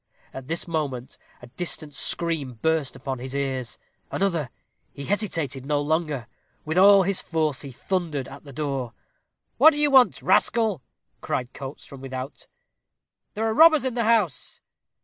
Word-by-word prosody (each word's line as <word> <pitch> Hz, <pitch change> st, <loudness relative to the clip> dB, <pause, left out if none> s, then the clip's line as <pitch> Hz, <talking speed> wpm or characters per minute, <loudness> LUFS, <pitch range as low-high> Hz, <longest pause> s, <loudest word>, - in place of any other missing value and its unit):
At 130 Hz, -1 st, -8 dB
this 165 Hz, +3 st, -2 dB
moment 140 Hz, -7 st, -4 dB, 0.2 s
a -, -, -7 dB
distant 155 Hz, +2 st, -4 dB
scream 150 Hz, -4 st, -1 dB
burst 160 Hz, -4 st, +1 dB
upon 135 Hz, -2 st, -5 dB
his 130 Hz, +2 st, -6 dB
ears 130 Hz, -3 st, -3 dB, 0.3 s
another 170 Hz, -9 st, -1 dB, 0.4 s
he 140 Hz, -, -8 dB
hesitated 165 Hz, -, -2 dB
no 145 Hz, +1 st, 0 dB
longer. 150 Hz, -4 st, -1 dB, 0.4 s
With 160 Hz, +3 st, +1 dB
all 200 Hz, 0 st, +7 dB
his 195 Hz, +1 st, 0 dB
force 155 Hz, -4 st, -1 dB
he 140 Hz, -, -8 dB
thundered 155 Hz, -2 st, -3 dB
at 135 Hz, +1 st, -11 dB
the 140 Hz, -, -11 dB
door. 135 Hz, -4 st, -3 dB, 0.7 s
"What 315 Hz, -, +9 dB
do -, -, -5 dB
you 295 Hz, -1 st, +2 dB
want, 245 Hz, -, +5 dB
rascal?" 220 Hz, -, +2 dB, 0.4 s
cried 125 Hz, 0 st, -3 dB
Coates, 135 Hz, +1 st, -8 dB
from 135 Hz, -2 st, -11 dB
without. 130 Hz, +1 st, -7 dB, 0.9 s
"There 220 Hz, +2 st, -1 dB
are 220 Hz, -, +1 dB
robbers 310 Hz, -1 st, +6 dB
in 260 Hz, -, -1 dB
the 235 Hz, -2 st, 0 dB
house." 215 Hz, -, +1 dB
150 Hz, 155 wpm, -24 LUFS, 135-190 Hz, 0.9 s, What